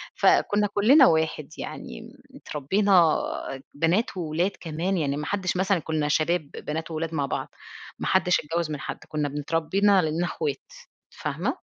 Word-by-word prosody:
فكُنّا 205 0 +3
كُلّنا 255 +7 +6
واحد. 160 -2 0
يعني - - -7 0.3
م - - -14
اتربينا 175 +3 +2 0.6
بنات 175 +8 +1
وولاد 170 +3 0
كمان 170 +4 -2
يعني، 145 -3 -1
ما 150 - -4
حدّش 185 -1 -1
مثلًا، 190 -1 +2
كُنّا 155 -1 -1
شباب 155 0 0
بنات 160 +2 -5
وولاد 165 +1 -3
مع 145 -3 0
بعض، - - -3 0.5
ما - - -3
حدّش 185 -1 +3
اتجوّز 165 +1 -2
من 145 - -4
حد، - - -6
كنّا 150 -2 -2
بن 145 - -5
اتربّينا 165 +7 +2
على 160 -4 +2
أننا 165 +3 -1
اخوات 430 - -3 0.5
فاهمة؟ - - -3
165 Hz, 160 wpm, -25 LUFS, 155-190 Hz, 0.6 s, كُلّنا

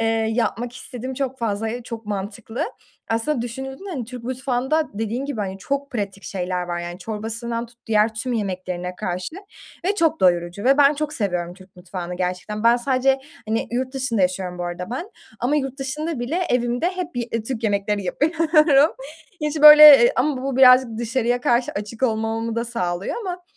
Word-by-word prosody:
Eee, - - +1 0.3
yapmak 240 +1 -1
istedim 255 0 -6
çok 265 0 -3
fazla, 220 -1 -2
e 240 +2 -4
çok 230 -2 -8
mantıklı. 210 +3 -4 0.4
Aslında 230 +3 0
düşünüldüğünde 265 - -6
hani 270 -9 -4
Türk 245 0 -9
mutfağında 260 +4 -1
dediğin 225 +5 -3
gibi, 280 -6 -4
hani, 195 -1 -4
çok 280 +6 -3
pratik 200 -4 -4
şeyler 180 -1 -3
var 175 -1 -3
yani 175 +1 -6
çorbasından 230 +2 -4
tut 235 0 -23
diğer 220 0 +2
tüm 245 +3 -3
yemeklerine 185 -4 -3
karşı 180 - -4 0.5
ve 395 +2 +1
çok 330 - +1
doyurucu 175 +1 +1
ve 270 +3 +4
ben 285 +1 +6
çok 300 +1 -3
seviyorum 180 - -2
Türk 185 0 -18
mutfağını 180 0 -6
gerçekten. 185 +4 -3
Ben 235 +1 +6
sadece, 265 +2 +1 0.3
hani, 225 +1 -1
yurt 255 +2 -2
dışında 245 -7 0
yaşıyorum 180 -1 -1
bu 175 - -3
arada 175 +3 -5
ben 335 - -5 0.3
ama 270 +5 +1
yurt 270 -1 -3
dışında 300 +2 -3
bile 265 +8 -2
evimde 245 +5 0
hep 355 -4 -5
ye 240 -1 -2
Türk 235 0 -4
yemekleri 205 0 0
yapıyorum. 310 - +3 0.5
Hiç, 300 0 -2
böyle 300 -3 +11
Iıı, - - +4
ama 285 -4 0
bu 270 -1 -2
birazcık 255 -3 +6
dışarıya 240 +1 0
karşı 245 0 +1
açık 210 +4 -6
olmamamı 225 -1 0
da 235 - 0
sağlıyor 180 -6 -3
ama 360 -3 -5
235 Hz, 175 wpm, -22 LUFS, 205-265 Hz, 0.5 s, böyle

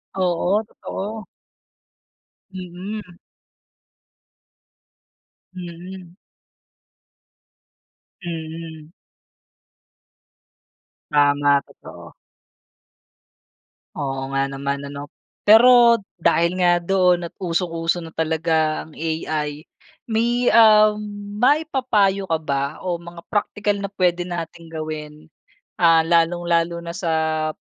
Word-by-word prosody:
Oo 185 +2 +1
totoo. 215 +1 -7 1.3
Mm. 185 +1 -8 2.4
Mm. 180 0 -9 2.1
Mm. 160 -2 -7 2.2
Tama, 145 -1 +3
totoo. - - -14 1.8
Oo 135 -1 -3
nga 135 0 0
naman 140 +1 -3
ano. 140 0 -7 0.4
Pero 235 +1 +7 0.2
dahil 170 +1 +2
nga 175 -1 +3
doon 180 -1 +2
at - - -39
usong-uso 170 -1 -1
na 165 - -8
talaga 160 -1 0
ang 160 - -17
AI 155 -1 -3 0.4
may, 240 +2 +1
um, 215 -2 +6 0.4
maipayo 250 -8 +2
ka 165 - +1
ba 140 0 -2
o 180 -2 -1
mga 170 0 -11
praktikal 205 0 -1
na 200 - -3
pwede 175 -2 +1
nating 170 -1 -6
gawin, 155 0 -7 0.5
ah, 165 -1 +5
lalong-lalo 170 0 +1
na 170 - -5
sa 170 -3 -2 0.4
p - - -54
170 Hz, 80 wpm, -21 LUFS, 160-195 Hz, 2.4 s, Pero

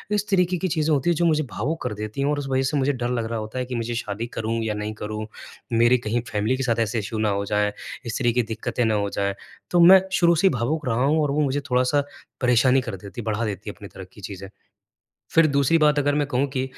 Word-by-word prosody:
इस 205 0 -1
तरीके 180 -2 +2
की 185 +2 -1
चीज़ें 155 -2 +1
होती 140 +4 +1
हैं 170 - +3
जो 170 - +1
मुझे 155 -2 +2
भावुक 145 +11 -3
कर - - -2
देती 105 +5 -5
हैं 140 - +1
और 145 0 0
उस 140 - -5
वज़ह 130 0 +1
से 150 - 0
मुझे 140 +1 +1
डर 120 -1 -3
लग 120 -2 -1
रहा 115 -1 -2
होता 110 +4 -5
है 125 - -2
कि 125 0 -5
मुझे 120 0 -3
शादी 115 0 -4
करूँ 115 +1 -1
या 110 -1 -1
नहीं 105 +1 -4
करूँ। 110 0 -5 0.5
मेरी 120 +2 +5
कहीं 120 0 -2
फैमिली 110 +5 0
के 135 - -2
साथ 115 -2 0
ऐसे 115 0 0
इश्यू 110 +2 -4
ना 110 -1 +1
हो 100 0 -1
जाएँ, 105 0 +1 0.3
इस 115 - -3
तरह 120 -2 +2
की 125 - +2
दिक्कतें 115 +2 -2
ना 110 - +2
हो 100 -1 0
जाएँ, 100 0 -1 0.4
तो 175 - +3
मैं 185 +2 +9
शुरू 170 -1 +4
से 185 +5 +3
ही - - +3
भावुक 145 +6 -1
रहा 120 +1 +1
हूँ 155 +3 +3
और 145 -2 0
वो 150 - 0
मुझे 140 +1 0
थोड़ा-सा 130 +3 +2 0.4
परेशानी 125 +1 +4
कर 120 -5 -5
देती 100 +4 -8
है - - -11
बढ़ा 110 +1 -1
देती 105 0 -5
है - - -6
अपनी 100 - -10
तरह 95 - -10
की 105 - -14
चीज़ें। 95 0 -7 0.9
फिर 165 -1 +6
दूसरी 140 +2 +3
बात 150 -2 +3
अगर 145 0 +1
मैं 150 -1 +1
कहूँ 135 0 +1
कि 130 -1 -2
125 Hz, 270 wpm, -23 LUFS, 110-145 Hz, 0.9 s, मैं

